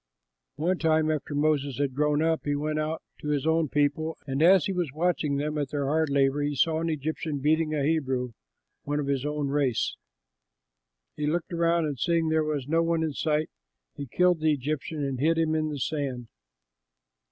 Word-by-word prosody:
One 175 +5 0
time, 155 -1 +2
after 150 -1 -3
Moses 145 -3 +1
had 140 -2 -1
grown 150 +2 +1
up, 160 0 +1
he 145 0 0
went 155 +1 -1
out 155 +1 -3 0.2
to - - -7
his 145 -2 0
own 160 -1 +2
people; 145 +3 0
and 135 +1 -2
as 180 0 +6
he 195 - -1
was 175 -6 -1
watching 155 -3 0
them 150 +1 -2
at 145 -2 -2
their 145 -1 -2
hard 155 +2 +1
labor, 140 0 +2
he 145 0 -1
saw 160 +3 +2
an 165 - -1
Egyptian 155 0 -3
beating 155 +2 +1
a 145 - 0
Hebrew, 130 -5 0 0.5
one 145 +1 -2
of 145 - -1
his 140 0 -1
own 150 -1 -2
race. 135 -4 0 1.2
He 150 - -2
looked 170 +3 -2
around 170 0 +2
and 145 -4 -4
seeing 165 +1 +1
that - - +1
there 160 0 +3
was 150 -4 -2
no 165 +2 +2
one 165 -1 +1
in 155 -2 -2
sight, 155 +1 0 0.4
he 140 - -6
killed 180 +5 +2
the 155 0 +3
Egyptian 150 +2 -3
and 135 -2 -3
hid 160 +4 +2
him 160 -1 +1
in 155 -1 0
the 150 - -4
sand. 135 -4 -3
150 Hz, 200 wpm, -27 LUFS, 145-160 Hz, 1.2 s, as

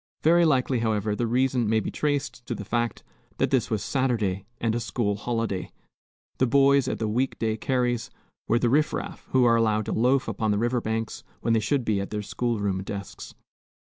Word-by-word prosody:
Very 170 +2 +5
likely, 130 -4 +2
however, 110 -2 0
the 120 +2 -1
reason 125 -1 +1
may 110 0 +3
be - - -4
traced 145 -4 -2
to 120 - -2
the 105 - -7
fact 120 +1 -1 0.3
that - - +1
this - - +2
was 110 -3 -1
Saturday, 110 -8 0
and 115 -1 0
a 120 - 0
school 115 -3 -1
holiday. 115 -3 -2 0.7
The 130 - +3
boys 140 +1 +4
at - - -1
the 110 - -2
week 125 +5 0
day 110 -1 0
carries 120 0 -1 0.4
were 115 - +3
the 120 - +1
riff 150 +3 +3
raff, - - -5
who 130 -1 +3
are 115 -1 +5
allowed 110 -2 +2
to - - -3
loaf 125 +4 +2
upon 110 - -1
the 105 - +2
river 120 +2 0
banks 110 0 -3 0.2
when 115 - +1
they 115 - +4
should 120 +4 0
be 105 -3 +1
at 100 - -5
their 105 -1 -3
school 115 +4 -1
room 100 -2 -1
desks. 100 0 -7
115 Hz, 205 wpm, -26 LUFS, 105-125 Hz, 0.7 s, Very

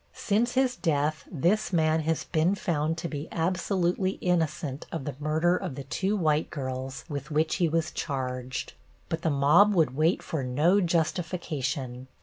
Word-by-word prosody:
Since 230 +4 0
his 260 -1 +2
death 155 -2 0
this 180 +7 +1
man 160 -2 +3
has 160 0 -1
been 165 +5 +1
found 165 -4 -1
to 170 - -3
be 150 0 -5
absolutely 180 +2 0
innocent 155 -6 -1
of 160 -5 -4
the 145 - -4
murder 160 +4 +2
of 140 - -4
the 140 - -6
two 185 - -1
white 155 -3 +1
girls 130 -2 -5
with 145 -3 -5
which 155 +1 +1
he 175 -3 +2
was 160 0 0
charged. 130 -3 -4 0.4
But 165 - -2
the 165 - +1
mob 155 +9 +5
would 155 -7 +2
wait 160 +5 +2
for 160 - -3
no 155 +10 +3
justification. 160 -7 -2
160 Hz, 160 wpm, -28 LUFS, 145-175 Hz, 0.4 s, mob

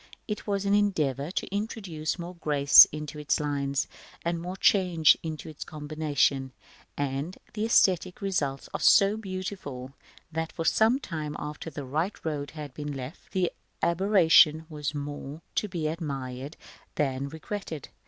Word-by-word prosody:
It 210 0 -4
was 200 -1 -1
an 200 - +2
endeavor 155 -9 +1
to 190 +1 -3
introduce 195 -8 -3
more 175 0 -6
grace 145 -5 +7
into 150 0 -7
its 150 - +1
lines, 140 -2 -1 0.4
and 170 0 -1
more 180 +2 -5
change 180 -6 +5
into 160 -1 -6
its 155 -2 -7
combinations; 145 -3 -1 0.4
and 140 +5 -2 0.2
the 215 0 -1
æsthetic 185 -5 +3
results 145 -9 -2
are - - -2
so 200 +1 +6
beautiful, 185 -10 -6 0.4
that 160 0 -3
for 165 - -4
some 225 - +4
time 155 - -5
after 150 +2 -6
the 145 -2 -7
right 160 +9 -1
road 145 -3 -2
had 145 -3 -7
been 150 0 -5
left, 135 +4 -8
the 185 -3 +1 0.3
aberration 170 -4 +5
was 150 -1 -4
more 145 +1 -6
to 210 - 0
be 175 -5 -4
admired 140 -3 -5 0.4
than 135 -1 -1
regretted. 160 - -6
155 Hz, 145 wpm, -28 LUFS, 145-185 Hz, 0.4 s, grace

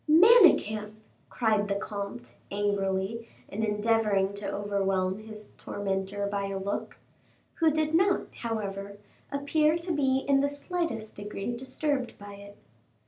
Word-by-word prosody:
'" - - -17
"Manicamp!" 305 - +6 0.4
cried 215 -3 +1
the 200 - 0
comte, 200 - -5
angrily, 200 +2 -1 0.2
and 220 +2 -3
endeavoring 210 -2 +2
to 200 0 -5
overwhelm 195 -1 0
his 215 -1 -11
tormentor 195 0 -3
by 200 0 -2
a 195 0 -3
look, 195 +1 -4 0.6
who 325 -1 +5
did 310 0 0
not, 380 +3 +4 0.2
however, 200 -3 -4 0.3
appear 300 +3 +2
to 345 +1 -4
be 270 -2 +1
in 275 -1 +4
the 285 - +2
slightest 285 - -3
degree 205 +3 -4
disturbed 260 +1 -2
by 205 0 -10
it. 200 0 -12
210 Hz, 135 wpm, -28 LUFS, 200-275 Hz, 0.6 s, Manicamp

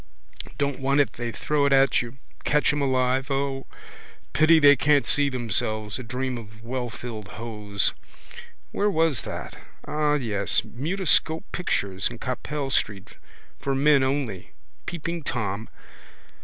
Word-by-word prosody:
Don't 140 -1 -1
want 135 +2 +2
it 135 -5 +2
they 120 -1 -4
throw 145 +4 0
it 140 - +2
at 135 -1 +5
you. 120 +2 -8 0.3
Catch 150 0 +3
em 145 - -1
alive, 130 0 +1
O. 135 -1 -1 0.7
Pity 160 +1 +6
they 145 -2 +8
can't 145 +1 +3
see 145 -1 +2
themselves. 110 -4 -2
A - - -5
dream 125 +1 -3
of 110 0 -13
wellfilled 120 -3 -5
hose. 105 -3 -1 0.8
Where 205 +1 +1
was 160 - +2
that? - - -6 0.3
Ah, 150 -1 +1
yes. 105 -8 0
Mutoscope 160 - 0
pictures 100 - -1
in 120 - -8
Capel 135 +3 -3
street: 100 -6 -1 0.4
for 135 -1 -1
men 145 +1 +5
only. 130 - -2 0.3
Peeping 170 0 -3
Tom. 110 -6 -3
130 Hz, 135 wpm, -25 LUFS, 115-145 Hz, 0.8 s, they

